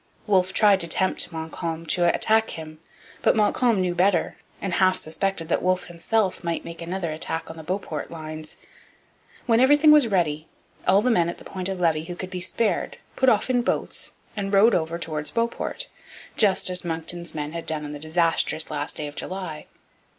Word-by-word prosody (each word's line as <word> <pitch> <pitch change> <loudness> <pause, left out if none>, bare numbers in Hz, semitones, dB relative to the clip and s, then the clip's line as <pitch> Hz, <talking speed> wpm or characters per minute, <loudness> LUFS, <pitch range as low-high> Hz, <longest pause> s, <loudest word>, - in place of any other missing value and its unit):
Wolfe 190 -3 +2
tried 200 0 +4
to 170 - +3
tempt 185 +2 +1
Montcalm 160 0 -5
to 175 +2 +1
attack 220 0 +3
him. 155 -1 -9 0.4
But - - +3
Montcalm 220 +1 +2
knew 180 -1 0
better; 180 0 +2 0.2
and 195 -3 -3
half 185 +1 +3
suspected 165 +2 -2
that - - +1
Wolfe 185 0 +1
himself 185 +4 -1
might 170 -1 -2
make 170 0 -8
another 170 0 -3
attack 160 +1 -3
on - - -11
the 160 - -8
Beauport 185 +5 -4
lines. 155 -1 -8 0.9
When 230 -1 +3
everything 290 +4 +6
was 300 -5 +6
ready, 160 -6 0 0.4
all 195 +3 +5
the 250 - +3
men 170 -6 +2
at 170 - -6
the - - -15
Point 185 -1 -3
of 190 -1 -4
Levy 160 -2 +1
who 175 +1 -6
could 185 +1 -7
be 180 -1 -4
spared 210 +4 0 0.2
put 260 - +4
off 220 - +2
in 250 -1 +2
boats - - -2 0.2
and 200 -2 -3
rowed 205 +3 +5
over 165 0 0
towards 155 -3 -3
Beauport, 235 - -2 0.5
just 195 -3 +4
as 180 - +2
Monckton's 170 0 -3
men 150 -1 -3
had 165 0 -6
done 155 -1 -1
on 145 - -6
the 145 - -7
disastrous 160 0 +1
last 145 0 -2
day 150 - -3
of 145 - -7
July. 180 -2 -6
175 Hz, 190 wpm, -24 LUFS, 160-195 Hz, 0.9 s, everything